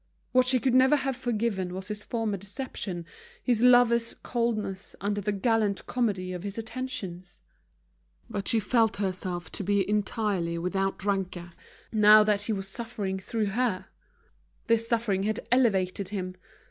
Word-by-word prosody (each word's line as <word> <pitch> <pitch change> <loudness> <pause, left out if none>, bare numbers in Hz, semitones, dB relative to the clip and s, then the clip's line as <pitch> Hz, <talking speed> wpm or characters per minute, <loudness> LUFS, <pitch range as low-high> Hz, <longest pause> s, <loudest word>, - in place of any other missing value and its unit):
What 255 0 +4
she 255 0 +4
could 260 0 +1
never 260 +3 +6
have 270 -2 -1
forgiven 215 -7 -1
was 190 +1 -6
his 210 0 -5
former 225 -3 -2
deception, 195 -3 -5 0.4
his 240 -3 +2
lover's 240 -2 +5
coldness 220 -5 -2
under 205 0 -1
the 210 +1 -1
gallant 210 -1 +1
comedy 200 -7 -1
of 180 - -5
his 200 +2 -6
attentions. 210 -7 -6 0.9
But 200 - -4
she 230 - +3
felt 225 0 +2
herself 185 -3 -3
to - - -4
be 200 0 +1
entirely 205 -4 0
without 190 +2 -2
rancour, 190 -3 -2 0.4
now 215 0 +7
that 210 -1 +2
he 210 - -2
was 195 -2 -2
suffering 205 -3 -4
through 210 +1 -2
her. 230 -5 -1 0.8
This 230 0 +2
suffering 225 -5 +1
had 215 +3 -2
elevated 200 -6 +2
him. 185 -3 -4
210 Hz, 145 wpm, -28 LUFS, 190-235 Hz, 0.9 s, now